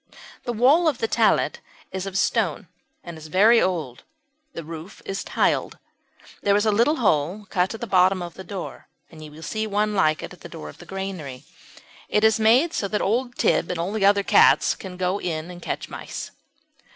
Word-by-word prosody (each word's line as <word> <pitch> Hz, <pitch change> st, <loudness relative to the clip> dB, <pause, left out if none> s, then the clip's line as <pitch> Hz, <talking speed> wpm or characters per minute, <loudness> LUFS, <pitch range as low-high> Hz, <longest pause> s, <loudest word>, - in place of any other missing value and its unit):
The 240 Hz, -, -1 dB
wall 270 Hz, +9 st, +4 dB
of 295 Hz, -5 st, +1 dB
the 225 Hz, -, -1 dB
tallet 225 Hz, -1 st, +2 dB, 0.3 s
is 190 Hz, +1 st, -4 dB
of 190 Hz, -1 st, -3 dB
stone 190 Hz, -3 st, 0 dB, 0.4 s
and 170 Hz, -2 st, -9 dB
is 155 Hz, -, -10 dB
very 215 Hz, +8 st, +5 dB
old; 160 Hz, -10 st, -2 dB, 0.5 s
the 165 Hz, -, -6 dB
roof 165 Hz, +4 st, -10 dB
is 195 Hz, -, -4 dB
tiled. -, -, 0 dB, 0.6 s
There 200 Hz, 0 st, +3 dB
is 205 Hz, +1 st, +2 dB
a 215 Hz, -, +3 dB
little 235 Hz, +9 st, +3 dB
hole 190 Hz, -, 0 dB
cut 185 Hz, +4 st, 0 dB
in -, -, -9 dB
the -, -, -2 dB
bottom 185 Hz, -2 st, +3 dB
of 175 Hz, -1 st, -7 dB
the 190 Hz, -, -10 dB
door, 190 Hz, 0 st, -7 dB, 0.2 s
and 155 Hz, -2 st, -12 dB
you 155 Hz, -, -9 dB
will 155 Hz, +2 st, -13 dB
see 220 Hz, +4 st, -3 dB
one 210 Hz, +1 st, 0 dB
like 155 Hz, -6 st, +2 dB
it -, -, -7 dB
in -, -, -15 dB
the -, -, -11 dB
door 75 Hz, -, -8 dB
of -, -, -14 dB
the -, -, -13 dB
granary. 185 Hz, -9 st, -6 dB, 0.7 s
It 210 Hz, -, +1 dB
is 220 Hz, +1 st, +4 dB
made 245 Hz, +10 st, +4 dB
so 200 Hz, -, -1 dB
that 210 Hz, +1 st, -1 dB
old 240 Hz, +4 st, -1 dB
Tib -, -, +2 dB
and 180 Hz, +4 st, -2 dB
the 215 Hz, -, -1 dB
other 200 Hz, 0 st, +4 dB
cats -, -, +5 dB
can 190 Hz, -5 st, -9 dB
go 185 Hz, +2 st, -1 dB
in 165 Hz, 0 st, -4 dB
and 175 Hz, 0 st, -11 dB
catch -, -, -4 dB
mice. -, -, -7 dB
195 Hz, 205 wpm, -23 LUFS, 170-220 Hz, 0.7 s, very